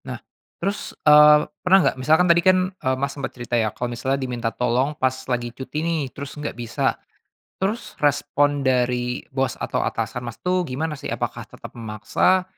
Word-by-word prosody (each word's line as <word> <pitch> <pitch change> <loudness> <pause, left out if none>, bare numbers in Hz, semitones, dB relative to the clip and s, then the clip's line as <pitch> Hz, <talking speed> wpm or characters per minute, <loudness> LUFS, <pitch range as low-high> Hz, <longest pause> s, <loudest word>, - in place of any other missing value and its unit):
Nah, - - -4 0.4
terus, 200 +4 -3
eee, 150 0 +8 0.2
pernah 190 +1 +5
nggak, - - +2
misalkan 160 +6 +4
tadi 170 0 +6
kan, 185 +1 +5 0.2
eee, 130 -8 -1
Mas 140 +1 -1
sempat 140 -2 -5
cerita 120 0 -8
ya, 110 -2 +2
kalau 125 +1 -3
misalnya 130 +3 -1
diminta 125 -4 -2
tolong 125 +5 0
pas 130 -3 +1 0.2
lagi 120 -1 -2
cuti 150 +5 -4
nih, 165 -2 0
terus 140 0 -7
nggak 150 -3 -5
bisa. 120 -2 -1 0.7
Terus, 210 +5 -2
respon 145 0 +2
dari 125 -1 +1
bos 130 -1 0
atau - - -2
atasan 115 +2 -3
Mas 115 - -6
tuh, 180 -1 +1
gimana 155 +4 -3
sih? - - -7
Apakah - - -4
tetap - - -11
memaksa, 115 - +1
135 Hz, 175 wpm, -22 LUFS, 125-155 Hz, 0.7 s, eee